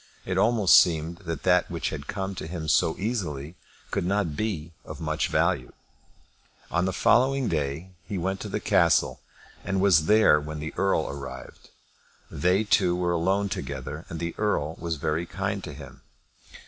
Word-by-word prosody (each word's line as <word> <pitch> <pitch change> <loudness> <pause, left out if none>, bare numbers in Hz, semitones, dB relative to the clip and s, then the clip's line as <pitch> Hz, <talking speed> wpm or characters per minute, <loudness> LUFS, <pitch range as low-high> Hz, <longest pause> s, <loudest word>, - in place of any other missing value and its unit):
It 95 - -2
almost 105 0 +6
seemed 85 0 0
that 80 -3 -4
that - - +3
which - - -3
had - - -6
come 95 0 -3
to 85 - -6
him 80 -2 -5
so 80 +2 +2
easily 85 - -3 0.4
could - - -1
not 95 -4 0
be 85 -7 -3
of - - -9
much 80 -1 -1
value. 65 - 0 1.0
On 85 +2 +1
the 95 - 0
following 130 +6 +3
day 75 +4 -2 0.2
he 100 - -3
went 95 +2 -2
to - - -6
the - - -2
castle, - - +2 0.4
and 95 0 -1
was 90 -5 +4
there 105 -8 +6
when 75 +1 -6
the 80 +1 -5
Earl 95 -5 +1
arrived. 70 -1 -9 0.6
They 90 +8 +2
two 90 -4 +3
were 90 -1 0
alone 95 +4 +1
together, 75 -3 -5
and 80 - -6
the 85 0 -3
Earl 80 -7 0
was 85 -1 -2
very 80 +3 -2
kind 100 +1 -3
to 80 - -7
him. 70 -1 -11
85 Hz, 170 wpm, -26 LUFS, 80-100 Hz, 1.0 s, almost